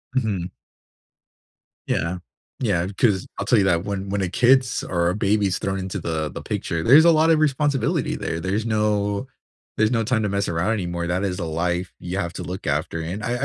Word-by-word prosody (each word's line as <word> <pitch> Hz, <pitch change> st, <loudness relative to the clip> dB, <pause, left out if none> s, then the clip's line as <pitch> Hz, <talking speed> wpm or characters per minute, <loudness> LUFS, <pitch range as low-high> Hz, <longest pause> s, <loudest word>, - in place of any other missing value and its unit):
Mhm. 100 Hz, -8 st, -1 dB, 1.4 s
Yeah, 85 Hz, +3 st, -1 dB, 0.4 s
yeah, 95 Hz, -8 st, 0 dB
'cause 100 Hz, -6 st, +2 dB
I'll 100 Hz, -, -3 dB
tell 120 Hz, -, +4 dB
you 95 Hz, -, +3 dB
that 85 Hz, -1 st, +2 dB
when 100 Hz, -1 st, -4 dB
when 100 Hz, 0 st, -1 dB
a 90 Hz, -, -1 dB
kid's 125 Hz, +4 st, +3 dB
or 85 Hz, -1 st, 0 dB
a 90 Hz, -, -1 dB
baby's 100 Hz, -2 st, +1 dB
thrown 95 Hz, 0 st, -2 dB
into 95 Hz, 0 st, -4 dB
the 80 Hz, -2 st, -2 dB
the -, -, -7 dB
picture, 85 Hz, -1 st, -3 dB
there's 145 Hz, +8 st, +7 dB
a 170 Hz, -, +7 dB
lot 160 Hz, 0 st, +4 dB
of 160 Hz, -, +4 dB
responsibility 145 Hz, -2 st, +1 dB
there 80 Hz, -, -3 dB
there's 100 Hz, +6 st, -1 dB
no 105 Hz, 0 st, 0 dB, 0.5 s
there's 110 Hz, +1 st, +3 dB
no 115 Hz, -2 st, +1 dB
time 115 Hz, 0 st, +1 dB
to 105 Hz, -, 0 dB
mess 100 Hz, 0 st, -1 dB
around 85 Hz, +5 st, 0 dB
anymore, 85 Hz, -4 st, -3 dB
that 90 Hz, +3 st, -1 dB
is 90 Hz, -2 st, -2 dB
a 85 Hz, -, -2 dB
life 90 Hz, +3 st, -2 dB
you 90 Hz, +2 st, -4 dB
have 85 Hz, 0 st, -2 dB
to -, -, -6 dB
look 90 Hz, -1 st, -6 dB
after, 75 Hz, +3 st, -1 dB
and 90 Hz, +6 st, -5 dB
I 120 Hz, +3 st, -1 dB
100 Hz, 205 wpm, -23 LUFS, 85-110 Hz, 1.4 s, there's